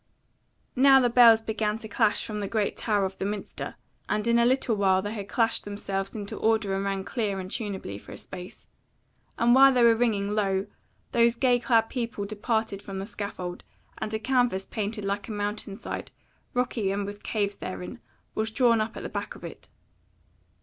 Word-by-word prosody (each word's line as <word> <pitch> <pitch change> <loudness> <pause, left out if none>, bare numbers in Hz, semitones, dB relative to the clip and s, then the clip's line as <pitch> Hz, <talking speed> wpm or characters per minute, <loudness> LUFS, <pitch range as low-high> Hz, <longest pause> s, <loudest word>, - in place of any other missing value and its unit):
Now 270 +1 +7
the 245 -2 +2
bells 230 -2 +7
began 220 -1 -1
to 225 -1 -8
clash 220 -1 +1
from 215 -2 -4
the 200 - -2
great 210 -1 0
tower 205 -3 +1
of 190 0 -6
the - - -2
minster, 205 +1 -4 0.3
and 210 +2 0
in 235 0 +4
a 235 - +5
little 255 -3 +2
while 190 -2 +3
they 205 +1 -3
had 200 -3 -5
clashed 230 -1 +1
themselves 195 -1 -4
into 205 -2 -5
order 220 -3 +1
and 195 0 -1
rang 195 -1 -1
clear 205 -3 -2
and 185 0 -7
tuneably 190 - -4
for - - -13
a - - -8
space; 180 0 -9 0.7
and 240 +1 +4
while 270 +1 +8
they 250 -2 +3
were 230 -1 +7
ringing, 215 -4 +1
lo! 195 -2 +1 0.5
those 235 0 +4
gay 245 0 +3
clad 230 -2 +3
people 230 -5 -3
departed 215 -1 -2
from 195 -1 -7
the 195 - -3
scaffold, 200 -4 -6 0.4
and 215 - -3
a - - +1
canvas 245 -5 +1
painted 210 0 -3
like 200 +1 -2
a - - -6
mountain 205 -1 -4
side, 235 - -6 0.5
rocky 240 -5 0
and 200 0 -1
with 205 +1 -7
caves 205 -2 -1
therein, 185 +6 -6 0.3
was 220 0 -1
drawn 230 -1 +3
up 220 +1 -3
at - - -6
the - - -3
back - - -5
of - - -14
it. - - -10
215 Hz, 195 wpm, -27 LUFS, 200-230 Hz, 0.7 s, while